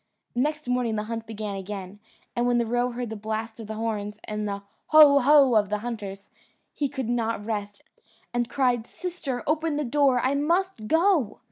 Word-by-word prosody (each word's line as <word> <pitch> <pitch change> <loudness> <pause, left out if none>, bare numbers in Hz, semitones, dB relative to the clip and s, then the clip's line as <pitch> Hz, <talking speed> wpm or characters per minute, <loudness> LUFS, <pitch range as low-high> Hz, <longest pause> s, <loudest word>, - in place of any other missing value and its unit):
Next 300 +3 -1
morning 250 -3 0
the 210 - -1
hunt 225 0 -5
began 215 -2 -5
again, 195 0 -7 0.4
and 240 0 +1
when 245 0 +3
the 235 - +2
roe 245 +2 +1
heard 240 -2 -5
the - - -4
blast 220 +2 -4
of 225 - -7
the 220 - -5
horns, 210 -2 -3
and 210 0 -3
the 200 0 -4 0.2
"Ho! 300 -2 +8
ho!" 275 -1 +6
of 210 -3 +3
the 210 - 0
hunters, 200 -4 -6 0.4
he 285 -2 -1
could 265 -4 -4
not 230 -3 -1
rest, 205 -2 -4 0.5
and 240 0 0
cried, 245 -3 +1
"Sister, 335 -9 -4
open 310 0 0
the 300 - -1
door; 270 0 +3
I 260 +2 +1
must 325 - 0
go." 320 - +2
235 Hz, 190 wpm, -26 LUFS, 215-280 Hz, 0.5 s, Ho